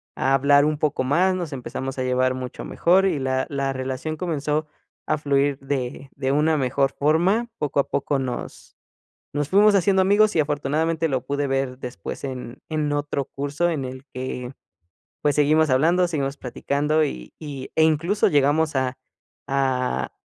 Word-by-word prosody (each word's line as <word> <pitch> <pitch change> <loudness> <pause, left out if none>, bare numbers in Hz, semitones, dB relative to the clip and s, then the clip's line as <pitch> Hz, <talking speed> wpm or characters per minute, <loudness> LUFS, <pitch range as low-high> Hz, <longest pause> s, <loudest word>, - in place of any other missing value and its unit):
a 135 +1 +1
hablar 140 +1 +5
un 155 0 0
poco 145 -3 0
más, 175 +8 +2
nos 175 -4 -4
empezamos 130 +1 -5
a 130 - -1
llevar 130 0 +1
mucho 130 -1 -6
mejor, 185 +3 +3
y 175 -7 +1
la 130 0 0
la 140 -1 -1
relación 130 +4 -4
comenzó 155 -2 -2 0.4
a 155 - +1
fluir 140 -1 +1
de 135 0 -4
de 135 -1 -1
una 155 +2 +3
mejor 135 0 +1
forma. 180 +11 +2
Poco 145 -1 -1
a - - -10
poco 140 0 0
nos 130 -2 -6 0.6
nos 145 -1 -1
fuimos 205 +2 +6
haciendo 190 0 +3
amigos 205 +2 +4
y, 155 - +5
afortunadamente, 155 +3 0
lo 130 -3 0
pude 140 +1 -1
ver 135 -1 -1
después 125 +2 -7
en 125 -3 -6
en 155 -2 -1
otro 145 -1 -2
curso 145 +5 -2
en 145 -5 -2
el 130 +1 -8
que, 125 0 -5 0.7
pues, 145 -1 +2
seguimos 155 +1 +3
hablando, 165 +7 +3
seguimos 140 -3 -2
platicando. 145 +5 0
Y 60 - -7
y, 140 -4 -7
eh, 160 - +4
incluso 165 +6 +2
llegamos 150 +2 +2
a 130 0 -1 0.5
a 130 -2 0
145 Hz, 165 wpm, -23 LUFS, 130-155 Hz, 0.7 s, fuimos